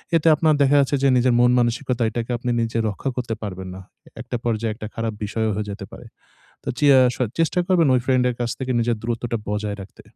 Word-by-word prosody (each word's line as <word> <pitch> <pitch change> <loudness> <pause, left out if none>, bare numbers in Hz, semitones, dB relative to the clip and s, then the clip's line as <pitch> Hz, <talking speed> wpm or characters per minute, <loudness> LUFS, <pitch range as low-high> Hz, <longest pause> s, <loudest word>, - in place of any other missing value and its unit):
এতে 165 0 +2
আপনার 155 0 +3
দেখা 140 +1 +4
যাচ্ছে 140 +1 +2
যে - - +5
নিজের 125 0 +3
মন 120 0 +5
মানসিকতা 120 +1 0
এটাকে 115 +2 -4
আপনি 120 +1 -4
নিজে 115 0 -2
রক্ষা 105 +7 -4
করতে 120 -3 -3
পারবেন 95 -3 -6
না। 95 - -9 0.4
একটা 125 0 -4
পর্যায়ে 115 -1 -1
একটা 110 -1 -7
খারাপ 115 -1 -2
বিষয়ও 110 +1 -1
হয়ে 105 0 -3
যেতে 100 -1 -7
পারে। 120 - -11 0.6
তো - - -5
চে 145 - +2 0.2
আস 125 -1 +1 0.2
চেষ্টা 165 +2 +1
করবেন 175 -5 +3
ওই 125 - +3
ফ্রেন্ড 130 -1 +2
এর 125 - -1
কাছ 120 -1 -1
থেকে 130 -1 -2
নিজের 115 0 0
দূরত্বটা 115 0 -2
বজায় 105 0 -2
রাখতে। 95 - -12
120 Hz, 220 wpm, -22 LUFS, 110-130 Hz, 0.6 s, যে